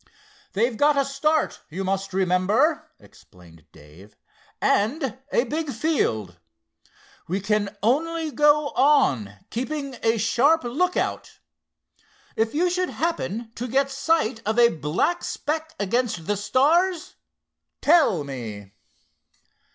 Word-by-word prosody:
"They've 225 +3 0
got 290 +2 +3
a 275 - +2
start, 300 +3 0
you 185 +5 -4
must 195 0 -2
remember," 190 - +1
explained 85 -4 -19
Dave, 80 +8 -17 0.4
"and 255 +3 0
a 235 - +3
big 305 +4 -3
field. 110 - -1 0.9
We 185 +4 -1
can 205 0 -1
only 320 +6 0
go 295 0 +3
on, 250 - +2 0.2
keeping 275 +2 -4
a 225 0 +2
sharp 270 +9 +3
lookout. 315 +10 -2 1.0
If 225 +4 -1
you 350 +4 +2
should 365 0 -1
happen 235 - -3
to 245 +2 -5
get 275 +3 +1
sight 270 -4 0
of 220 +2 -1
a 235 -1 +6
black 160 - -1
speck 315 +1 -4
against 205 -4 -1
the 205 - 0
stars, 310 - +1 0.6
tell 285 - +4
me." 110 -8 -7
240 Hz, 115 wpm, -24 LUFS, 195-300 Hz, 1.0 s, a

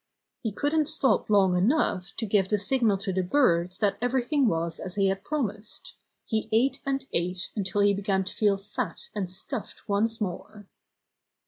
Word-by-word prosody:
He 225 - -2
couldn't 295 +7 +1
stop 270 -10 +2
long 195 -3 +4
enough 195 - +1
to 225 - -2
give 195 -2 +2
the 210 - +2
signal 215 0 +2
to 195 0 -3
the 185 - +1
birds 180 -5 +2
that 205 -2 +1
everything 260 +2 +2
was 165 -3 -1
as 185 - -6
he 195 -1 +3
had 195 0 -2
promised. 215 -7 -4 0.3
He 220 -2 -2
ate 260 +5 +2
and 270 -1 -1
ate 180 +2 -1
until 205 -1 0
he 200 0 +5
began 195 -1 0
to 190 - -5
feel 205 -2 +2
fat 205 0 -5
and 195 -4 -3
stuffed 210 +6 -7
once 220 +3 +1
more. 205 +1 -5
205 Hz, 175 wpm, -27 LUFS, 190-245 Hz, 0.3 s, he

